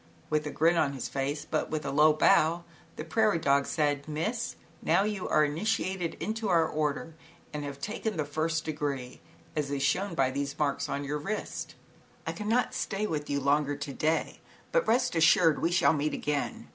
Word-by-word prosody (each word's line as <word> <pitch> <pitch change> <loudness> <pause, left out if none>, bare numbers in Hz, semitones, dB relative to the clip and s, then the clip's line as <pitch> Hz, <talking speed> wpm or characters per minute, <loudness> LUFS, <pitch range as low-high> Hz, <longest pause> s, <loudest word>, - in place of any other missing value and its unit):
With 155 0 +1
a - - -2
grin 165 +3 +2
on 140 -3 +2
his 130 -3 -4
face 135 +4 -3
but - - -1
with 155 -1 -3
a - - -2
low 150 +2 +6
bow, 160 +2 +3 0.3
the - - -5
prairie 215 +2 +2
dog 140 -3 +2
said: 145 -2 0
"Miss, 220 +11 -2 0.3
now 175 +5 +3
you 205 -3 -2
are 155 0 +4
initiated 180 +2 -1
into 220 -1 -3
our 165 -2 +4
Order 155 +1 -2 0.4
and 150 -1 -3
have 140 -1 -6
taken 210 +4 -3
the 155 - 0
first 160 +2 -1
degree, 140 -5 -4 0.3
as 150 -2 -1
is 140 -1 -1
shown 190 +8 0
by 130 -1 +2
these 140 +1 -3
marks 145 -2 0
on 140 - -2
your 145 +1 -2
wrist. 215 +8 -4 0.3
" - - -31
I - - -1
cannot 225 +4 0
stay 200 +1 -2
with 150 -6 -3
you 140 0 0
longer 145 +1 +2
to 140 -1 -6
day, 155 +4 0 0.3
but, - - +2
rest 245 -2 +2
assured, 165 0 +5
we 165 - +2
shall 175 -2 +4
meet 150 0 -1
again. 145 -1 -2
155 Hz, 195 wpm, -29 LUFS, 145-175 Hz, 0.4 s, low